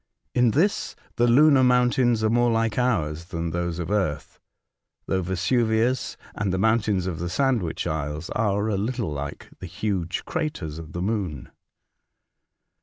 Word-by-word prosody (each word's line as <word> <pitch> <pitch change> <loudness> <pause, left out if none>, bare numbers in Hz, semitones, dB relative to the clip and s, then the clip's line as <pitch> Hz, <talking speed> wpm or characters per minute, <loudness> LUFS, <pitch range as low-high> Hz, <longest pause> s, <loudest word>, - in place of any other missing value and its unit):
In 125 -1 +4
this 170 - +1 0.2
the 120 - +4
lunar 140 +2 +6
mountains 125 -2 +3
are 110 - +3
more 120 +1 +3
like 115 0 0
ours 85 -10 0
than 85 -2 -4
those 85 0 -2
of 85 +1 -4
earth, 85 -9 -2 0.7
though 95 - 0
Vesuvius 110 +7 0 0.2
and 105 -2 -2
the 95 - 0
mountains 105 -2 +2
of 85 -4 -3
the 85 0 -3
Sandwich 120 - 0
Isles 75 +1 -3
are 105 -1 0
a 105 -3 0
little 115 -2 -2
like 70 +1 -6
the 90 - -7
huge 90 -1 -3
craters 150 - -3
of 80 -2 -10
the 85 - -3
moon. 95 - -3
105 Hz, 150 wpm, -25 LUFS, 85-120 Hz, 0.7 s, lunar